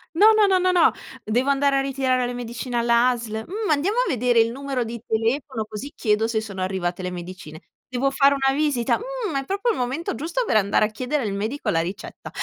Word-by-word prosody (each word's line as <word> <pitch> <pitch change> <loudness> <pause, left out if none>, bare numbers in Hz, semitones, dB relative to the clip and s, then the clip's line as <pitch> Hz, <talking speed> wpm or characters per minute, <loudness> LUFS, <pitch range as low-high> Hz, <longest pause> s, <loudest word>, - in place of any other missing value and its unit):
no, 410 +5 +7 0.2
no, 380 -1 +4
no, 365 0 +2
no. 355 -2 +5 0.3
Devo 245 +6 0
andare 280 0 +3
a - - +2
ritirare 260 -2 0
la 245 - -4
medicina 240 0 -4
alla 235 +1 +4
ASL? 225 -3 -3
"Mhmm, 415 +2 -3
andiamo 345 +10 +1
a - - +2
vedere 245 -2 +2
il 225 +1 +3
numero 270 -1 -3
di 230 0 -6
telefono, 225 +1 -1
così 230 +8 -7
chiedo 220 0 +1
se 225 - 0
sono 200 -4 -7
arrivate 185 -1 -2
le 180 - -3
medicine". 175 -3 -8 0.3
Devo 255 +2 0
fare 275 +1 +4
una 270 0 +1
visita? 285 -6 +1
"Mhmm, 475 - -4
è - - -11
proprio 400 - -1
il - - -3
momento 255 +7 -2
giusto 330 - -2
per 220 - +2
andare 200 +1 +3
a - - -2
chiedere 255 +4 -2
al 205 - -2
medico 220 +5 -3
la 165 -5 +2
ricetta". 195 +5 -7
250 Hz, 215 wpm, -23 LUFS, 220-280 Hz, 0.3 s, no